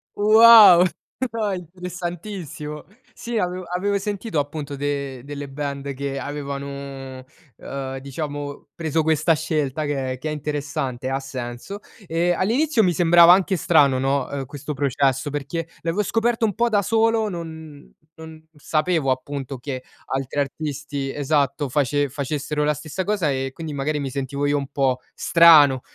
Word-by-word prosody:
Wow, 215 -4 +8 0.5
no, 215 -3 -1
interessantissimo. 175 -3 -6 0.3
Sì 235 0 -6
avevo 180 +1 -2
avevo 200 +2 0
sentito 205 -1 -4
appunto 145 0 -4
de 140 -2 -3
delle 145 0 -7
band 140 0 -4
che 140 0 -4
avevano, 140 -2 -6 0.3
uhm, 135 -1 -6
diciamo 145 +1 -6
preso 160 -1 0
questa 160 +1 +3
scelta 150 -1 -1
che 135 -3 -2
è 130 - -7
che 155 +4 -4
è - - -2
interessante, 140 -4 -3
ha 135 - -1
senso. 135 +7 -7 0.3
Ehm, 170 +2 +1
all'inizio 240 +5 +2
mi 180 -3 +2
sembrava 170 +1 +7
anche 190 0 +2
strano, 140 -6 +4
no, 135 +1 0
uhm, 140 -1 -3
questo 145 +3 -6
processo 135 0 0
perché 150 +3 -4
l'avevo 170 +5 0
scoperto 225 +3 +1
un 210 - 0
po' 235 +1 +2
da 205 -3 +2
solo, 225 0 +2
non 160 -4 -9 0.3
non 160 0 -11
sapevo 155 -1 0
appunto 135 0 -4
che 130 -1 -5 0.2
altri 135 +1 -3
artisti 145 -1 -3
esatto, 145 0 0
face 145 +1 +1
facessero 150 +2 -2
la 150 0 +2
stessa 155 +5 -5
cosa 195 -6 0
e 135 -1 -2
quindi 160 -1 -6
magari 145 +2 -1
mi 135 -1 -3
sentivo 140 +2 -2
io 145 0 +2
un 140 - -3
po' 130 -3 +1
strano, 150 -6 +6
150 Hz, 150 wpm, -22 LUFS, 140-175 Hz, 0.5 s, Wow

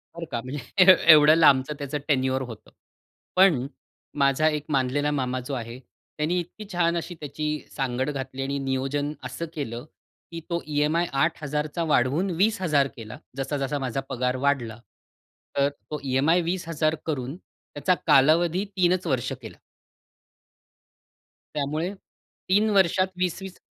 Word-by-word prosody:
बरं 170 0 -5
का, 120 -2 -2
म्हणजे 170 +8 +4 0.2
एवढं 150 +1 +7
लांबचं 145 -3 +4
त्याचं 145 +1 -3
टेन्युअर 130 -2 +1
होतं. 110 - -11 0.6
पण 180 -9 +5 0.6
माझा 140 +3 +3
1 150 -1 -1
मानलेला 145 +1 +1
मामा 130 -3 -1
जो 140 - -4
आहे, 120 0 -5 0.4
त्यानी 165 +4 0
इतकी 175 +5 -8
छान 170 -1 +1
अशी 170 +1 -5
त्याची 150 +1 -4 0.3
सांगड 130 0 -1
घातली 135 -1 -5
आणि 140 +1 -2
नियोजन 135 +2 -2
असं 170 - -5
केलं 125 -4 -5 0.5
की 165 - -5
तो 170 0 -1
ई-एम-आय 150 +3 +1 0.2
8000 150 -2 -1
चा 170 - 0
वाढवून 140 +10 +2
20000 185 -10 +2
केला. 110 -2 -8 0.2
जसा-जसा 140 +1 -2
माझा 135 0 -2
पगार 125 0 -1
वाढला. 120 -6 0 0.8
तर 140 0 +3
तो 150 +1 -8
ई-एम-आय 140 +6 +2
20000 165 -3 -1
करून 140 -2 -3
त्याचा 180 -1 -3
कालावधी 165 +7 +4
3च 180 -1 +2
वर्ष 130 -5 -1
केलं. - - -10 2.0
त्यामुळे 155 +5 -2 0.6
3 210 +3 +4
वर्षात 185 0 +3
20-20 185 +1 -3
150 Hz, 130 wpm, -25 LUFS, 135-170 Hz, 2.0 s, एवढं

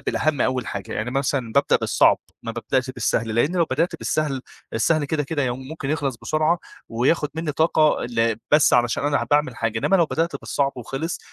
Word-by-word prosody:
بالأهم 155 -3 0
أول 130 -2 0
حاجة، 100 -2 -5
يعني 110 +3 -3
مثلًا 135 -3 -1
بابدأ 140 +3 +3
بالصعب، - - +3 0.2
ما 115 - -4
بابدأش 125 +3 -1
بالسهل، 115 -3 -1
لأن 145 +10 +1
لو 170 - +4
بدأت 170 +1 0
بالسهل، 145 -5 -1 0.3
السهل 150 +7 +2
كده، 150 +1 -1
كده 145 +1 -2
يم 130 +1 -3
ممكن 150 -3 -5
يخلص 145 -5 -1
بسرعة، 155 +7 +1 0.3
وياخد 135 +6 +1
مني 160 -1 -2
طاقة 155 0 +2
ل 115 -2 0
بس 150 0 +5
علشان 120 +2 +2
أنا 145 -4 +1
ه - - -1
باعمل 145 -4 +2
حاجة، 115 -1 -1
إنما 195 - +3
لو 170 -3 +3
بدأت 165 +3 -1
بالصعب 140 -1 -1
وخلص 135 +7 -4
140 Hz, 190 wpm, -23 LUFS, 120-155 Hz, 0.3 s, بس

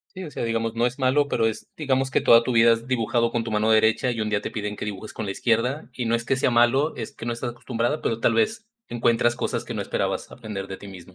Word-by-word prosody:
Sí, 185 0 -6
o 155 - -7
sea, - - -4
digamos, 115 0 -1
no 115 - +1
es 125 +3 -1
malo, 135 +2 +3
pero 115 -5 +1
es, 110 - -4
digamos, 135 -3 0
que - - +2
toda 115 0 +6
tu 125 - -1
vida 115 0 +6
has 115 +1 -8
dibujado 115 -1 +1
con 120 -1 -1
tu 115 - -5
mano 110 +1 +1
derecha 110 +3 +3
y 115 -2 -3
un 110 - -1
día 105 -1 0
te - - -4
piden 105 -1 -4
que - - -5
dibujes 105 +1 -6
con 110 - -4
la 100 - -3
izquierda, 125 +7 0
y 125 - -3
no 115 0 +1
es 115 0 -1
que 135 - +1
sea 130 - +2
malo, 120 +6 +3
es 115 - -6
que - - -8
no 120 - -1
estás 120 +1 -4
acostumbrada, 120 +3 -2
pero 115 0 -1
tal 115 - +2
vez 220 - 0 0.2
encuentras 120 0 +1
cosas - - -2
que - - -6
no - - -3
esperabas - - -2
aprender 105 -5 -6
de 95 - -7
ti 100 - -12
misma. 95 -1 -12
115 Hz, 285 wpm, -24 LUFS, 110-125 Hz, 0.2 s, toda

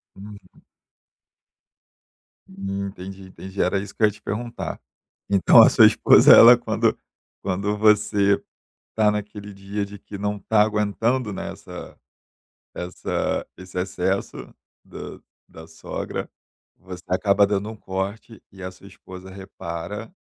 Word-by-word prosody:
Uhum. 100 +1 -14 1.9
Entendi, 95 0 -6
entendi. 95 +1 -7
Era - - +1
isso 100 0 -8
que - - -13
eu - - +8
ia 105 - -1
te 105 - -18
perguntar, 115 +3 -5 0.5
então 100 -2 +6
a - - +8
sua - - +6
esposa, - - +6
ela - - +9
quando - - 0 0.5
quando 100 +2 -2
você 105 -1 +3 0.5
tá 110 -1 +3
naquele 105 0 -6
dia 100 +1 -5
de 100 +1 -11
que 105 - -11
não 105 +1 -2
tá 105 +2 +2
aguentando, 110 +2 -1
né, - - -5
essa - - -11 0.8
essa 90 +1 -3
esse 95 0 -8
excesso 95 +1 -2 0.5
da - - -10 0.3
da 80 0 -13
sogra, 80 0 -6 0.5
você 90 -1 -11
acaba 100 +2 +3
dando 100 +1 -2
um 110 - -9
corte 100 +3 -6
e 95 -1 -12
a 95 - -4
sua 95 - -17
esposa 95 0 -12
repara, 95 - -7
100 Hz, 130 wpm, -23 LUFS, 95-105 Hz, 1.9 s, ela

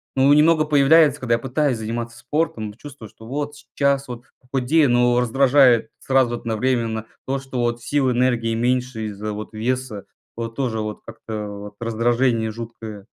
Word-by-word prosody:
Ну, 135 +2 +5
немного 155 +1 +4
появляется, 145 0 +5
когда 120 -2 0
я - - -3
пытаюсь 135 0 0
заниматься 115 +2 -5
спортом, 120 -5 -2
чувствую, 130 -2 -11
что 110 +2 -15
вот 145 +2 -3
сейчас 140 -1 -1
вот 120 0 -8 0.2
похудею, 135 +3 +2
но 120 0 +3
раздражает 130 +1 +4
сразу 130 -3 +2
одновременно 115 -1 -1 0.2
то, 135 +1 0
что 135 -2 -6
вот 120 -1 -1
сил, 140 -3 +1
энергии 120 -2 +1
меньше 125 -1 -1
из-за, 105 +1 -5
вот, 105 +1 -7
веса, 120 -1 -3 0.3
вот, 115 0 -5
тоже, 120 -5 -2
вот, 105 0 -5
как-то 110 -2 -6
вот, 100 0 -9
раздражение 115 0 +1
жуткое. 110 -2 -8
120 Hz, 155 wpm, -21 LUFS, 115-135 Hz, 0.3 s, Ну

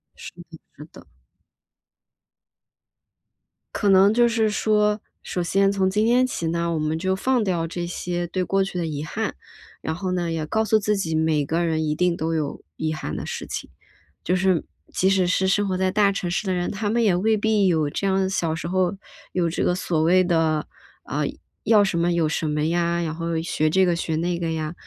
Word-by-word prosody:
是 - - -10 0.2
的 165 - -10 0.2
是 150 - -10
的。 - - -15 2.7
可 205 - +1
能 195 +2 +6
就 240 +1 +4
是 225 -2 +1
说， 210 0 +1 0.2
首 180 - -3
先 195 +3 +2
从 195 -1 +1
今 210 +3 +1
天 245 +2 +4
起 170 -9 -3
呢， 170 +1 -1
我 160 - -1
们 155 +1 -1
就 190 +3 0
放 245 +5 +1
掉 175 -4 -1
这 175 +1 -4
些 175 0 -3
对 185 +2 -3
过 195 +2 +1
去 190 -1 -5
的 170 -2 -1
遗 150 -2 -4
憾。 155 - -3 0.5
然 160 - -2
后 185 +2 -3
呢， 175 -2 -1
也 160 -2 -2
告 220 +8 0
诉 220 0 +3
自 210 0 0
己， 170 -5 -2
每 160 -2 +1
个 165 +4 0
人 160 -1 0
一 150 -1 0
定 180 +2 +1
都 165 0 -2
有 150 -3 -3
遗 155 0 -1
憾 155 - -5
的 - - -5
事 - - -5
情。 - - -6 0.5
就 180 - 0
是， 185 -2 +2 0.3
即 190 - +2
使 190 -2 +2
是 190 +1 +1
生 205 +1 +2
活 185 -1 -1
在 190 0 +1
大 205 0 +3
城 180 -3 -3
市 195 +3 -2
的 190 - +1
人， 175 -1 -1
他 205 +1 -2
们 235 +2 +1
也 205 -4 +4
未 220 +4 +2
必 210 -2 +2
有 160 -4 +2
这 195 - -2
样， 190 0 +1
小 165 -4 -1
时 170 +1 -5
候 185 +1 +1 0.4
有 175 -2 +1
这 165 - -1
个 180 - +2
所 170 -3 -1
谓 185 +3 +4
的， 160 -3 +1 0.4
啊， - - -2 0.4
要 215 -3 +5
什 190 -4 0
么 175 +1 +2
有 165 -2 +1
什 160 0 -1
么 150 0 -1
呀， 170 0 0
然 160 -2 -2
后 165 0 -2
学 155 -2 0
这 190 +4 +3
个 175 - +2
学 160 -1 -2
那 170 +2 -1
个 165 -1 -2
呀。 155 0 -3
175 Hz, 230 characters per minute, -23 LUFS, 165-195 Hz, 2.7 s, 能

